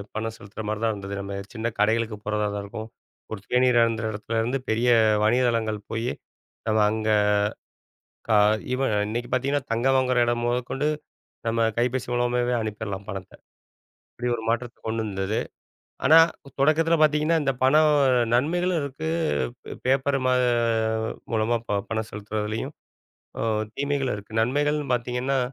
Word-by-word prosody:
பணம் 110 Hz, 0 st, -3 dB
செலுத்துற 100 Hz, +2 st, -9 dB
மாரிதான் 110 Hz, +1 st, 0 dB
இருந்தது. 100 Hz, -1 st, -6 dB
நம்ம 100 Hz, 0 st, -6 dB, 0.2 s
சின்னக் 115 Hz, 0 st, -3 dB
கடைகளுக்குப் 110 Hz, 0 st, +1 dB
போறதாதான் 105 Hz, -1 st, -1 dB
இருக்கும். 110 Hz, +2 st, -7 dB, 0.4 s
ஒரு 110 Hz, -3 st, -5 dB
தேநீர் 125 Hz, -1 st, +4 dB
அருந்திற 115 Hz, -1 st, 0 dB
இடத்துலருந்து, 115 Hz, +4 st, -1 dB
பெரிய 115 Hz, +3 st, +2 dB, 0.4 s
வணிகத்தளங்கள் 115 Hz, -2 st, +1 dB
போயி 115 Hz, +2 st, -1 dB, 0.6 s
நம்ம 110 Hz, 0 st, +2 dB
அங்க 110 Hz, 0 st, -1 dB, 1.2 s
க -, -, +2 dB, 0.4 s
ஈவென் 130 Hz, -3 st, 0 dB, 0.2 s
இன்னைக்கு 120 Hz, +2 st, -3 dB
பாத்தீங்கன்னா, 140 Hz, +2 st, 0 dB
தங்கம் 130 Hz, +4 st, +2 dB
வாங்குற 130 Hz, -1 st, +1 dB
இடம் 120 Hz, 0 st, 0 dB
முதகொண்டு 125 Hz, +4 st, -1 dB, 0.6 s
நம்ம 115 Hz, 0 st, +1 dB, 0.2 s
கைபேசி 125 Hz, +1 st, 0 dB
மூலமாவே 120 Hz, 0 st, +1 dB
அனுப்பிற்லாம், 105 Hz, -2 st, -5 dB
பணத்தை. 95 Hz, 0 st, -7 dB, 0.8 s
இப்படி 125 Hz, 0 st, -3 dB
ஒரு 110 Hz, -, -7 dB
மாற்றத்தை 120 Hz, +1 st, -2 dB
கொண்டு 110 Hz, 0 st, -1 dB
வந்தது. 100 Hz, +1 st, -2 dB, 0.7 s
ஆனா 160 Hz, -, +8 dB, 0.4 s
தொடக்கத்துல 160 Hz, +3 st, +4 dB
பாத்தீங்கன்னா, 155 Hz, +2 st, +3 dB
இந்த 135 Hz, -1 st, +1 dB
பணம் 150 Hz, +4 st, +5 dB, 0.4 s
நன்மைகளும் 175 Hz, +6 st, +1 dB
இருக்கு. 140 Hz, +3 st, -4 dB, 0.8 s
பேப்பர் 135 Hz, +1 st, +2 dB
மா 130 Hz, -, +3 dB, 1.0 s
மூலமா 115 Hz, +1 st, +2 dB, 0.3 s
பணம் 110 Hz, 0 st, -2 dB
செலுத்துறதுலயும் 105 Hz, +5 st, -4 dB, 1.0 s
தீமைகளும் 140 Hz, -3 st, -1 dB
இருக்கு. 105 Hz, +1 st, -12 dB
நன்மைகள்ன்னு 145 Hz, +4 st, 0 dB
பார்த்தீங்கன்னா, 125 Hz, +2 st, -1 dB
120 Hz, 120 wpm, -25 LUFS, 110-135 Hz, 1.2 s, ஆனா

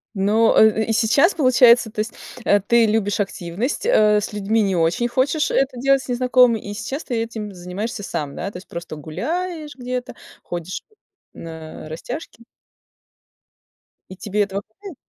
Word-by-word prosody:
Но, 210 Hz, +4 st, +3 dB
э, 220 Hz, 0 st, +5 dB
и 225 Hz, -, -1 dB
сейчас 240 Hz, -, +4 dB
получается, 245 Hz, -5 st, +5 dB
то 215 Hz, -, -8 dB
есть, 215 Hz, +2 st, -2 dB, 0.3 s
э, 205 Hz, -, +4 dB
ты 230 Hz, +4 st, +3 dB
любишь 210 Hz, -1 st, 0 dB
активность, 195 Hz, -, -3 dB
э, 215 Hz, -, +4 dB
с 210 Hz, -, -5 dB
людьми 210 Hz, +2 st, +1 dB
не 195 Hz, -3 st, +1 dB
очень 170 Hz, +8 st, +1 dB
хочешь 270 Hz, +5 st, 0 dB
это 265 Hz, -2 st, +1 dB
делать, 275 Hz, +2 st, +3 dB
с -, -, -12 dB
незнакомыми, 250 Hz, -2 st, +3 dB
и 205 Hz, 0 st, -7 dB
сейчас 240 Hz, +8 st, -5 dB
ты 245 Hz, -, -4 dB
этим 220 Hz, -3 st, -5 dB
занимаешься 190 Hz, +5 st, -5 dB
сам. 145 Hz, -6 st, -4 dB
Да, 185 Hz, -, -4 dB
то 180 Hz, -, -8 dB
есть 185 Hz, -, -12 dB
просто 170 Hz, -2 st, -7 dB
гуляешь 305 Hz, -, -4 dB
где-то, 250 Hz, 0 st, -5 dB, 0.3 s
ходишь 175 Hz, +1 st, -5 dB, 0.5 s
на 160 Hz, -1 st, -9 dB
растяжки. 235 Hz, -, -7 dB, 1.7 s
И 190 Hz, -, -9 dB
тебе 205 Hz, +2 st, -1 dB
этого 200 Hz, 0 st, -4 dB
хватает? 355 Hz, -, -12 dB
220 Hz, 160 wpm, -21 LUFS, 195-250 Hz, 1.7 s, э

